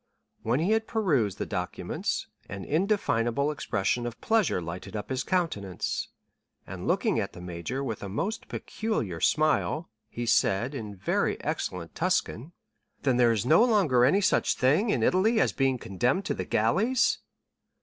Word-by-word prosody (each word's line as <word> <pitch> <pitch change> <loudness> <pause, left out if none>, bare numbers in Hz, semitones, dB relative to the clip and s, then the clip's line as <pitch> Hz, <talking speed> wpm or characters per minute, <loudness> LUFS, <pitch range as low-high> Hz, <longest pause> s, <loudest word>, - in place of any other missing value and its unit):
When 120 +5 +1
he 180 +6 +1
had 220 0 +1
perused 140 - +1
the - - -3
documents, 90 -3 -3 0.2
an 100 -1 -6
indefinable 145 - +1
expression 120 -3 -1
of 115 - -7
pleasure 220 - +2
lighted 85 +4 -7
up 105 +4 -5
his 130 0 -1
countenance, 130 - -2 0.6
and - - -7
looking - - +1
at - - -3
the - - -10
major 90 +9 -4
with 115 -6 -4
a 100 - -5
most 200 - -3
peculiar 120 - -3
smile, 155 - +1 0.2
he 120 - -4
said, 115 +3 +2
in 105 -6 -6
very 90 - 0
excellent 85 -3 -3
Tuscan: 175 -5 -1 0.5
"Then 130 -3 +2
there 120 -2 +5
is 110 0 0
no 160 - +6
longer 190 - +3
any 185 +11 +4
such - - +2
thing, 155 - +2
in - - +1
Italy 220 +5 +3
as - - +2
being 135 -1 +1
condemned 120 - -1
to - - 0
the 95 - -4
galleys?" 195 - +2
130 Hz, 160 wpm, -28 LUFS, -, 0.6 s, no